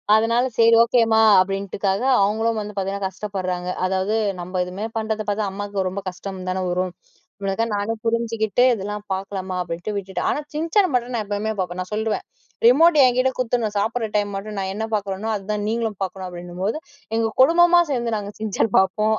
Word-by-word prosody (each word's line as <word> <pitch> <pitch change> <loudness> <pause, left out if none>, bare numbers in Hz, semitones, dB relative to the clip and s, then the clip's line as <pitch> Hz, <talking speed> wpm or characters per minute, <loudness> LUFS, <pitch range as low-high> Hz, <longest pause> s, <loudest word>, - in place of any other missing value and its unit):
அதனால, 230 +3 +2
சேரி. 230 0 +6
ஓகேம்மா. 230 -2 +3 0.2
அப்டின்ட்டுக்காக, 195 +1 -1 0.2
அவங்களும் 220 +3 +1
வந்து 210 0 -7
பாத்தீங்கனா, 195 +1 -2
கஷ்டப்பட்றாங்க. 185 -2 -4 0.2
அதாவது 190 +3 0 0.3
நம்ம, 180 +2 -8
எதுமே 185 +4 -5
பண்றத 220 0 -2
பாத்தா, 205 +1 0
அம்மாக்கு 200 -1 -3
ரொம்ப 195 +2 -5
கஷ்டம் 185 0 -7
தான 185 0 -1
வரும். 180 +1 -1 0.5
இவ்ளக்காக 200 +4 0
நானே 205 +2 -1
புரிஞ்சுகிட்டு, 230 0 +1
இதெல்லா 205 -1 -4 0.2
பாக்கலாமா. 190 -1 -4
அப்டின்ட்டு 175 +4 -4
விட்டுடே. 195 -1 -4
ஆனா, - - 0
"சிஞ்சான்" 330 +5 +2
மட்டு 245 0 0
நா, 230 - 0
எப்பைவுமே 205 +2 -2
பாப்பேன். 180 0 -3
நான் 180 - -7
சொல்றிவேன். 220 0 -1 0.4
ரிமோட் 310 +7 +6
என்கிட்ட 255 +1 +3
குடுத்துடணும். 230 -4 -1
சாப்பிட்ற 225 +2 -1
டைம் 205 -1 0
மட்டும். 205 +1 -6
நான் 190 0 -2
என்ன 220 +2 -3
பாக்குறனோ, 200 +1 -3
அதுதா 210 +1 -3
நீங்களும் 225 -3 -2
பாக்கணும், 190 0 -5
அப்டின்னும்போது, 180 - -4 0.4
எங்க 225 -1 +1
குடும்பமா 345 +4 +6
சேந்து, 235 -4 -1
நாங்க 205 0 -6
"சிஞ்சான்" 215 0 -1
பாப்போம். 215 +3 +2
210 Hz, 165 wpm, -22 LUFS, 190-225 Hz, 0.5 s, சேரி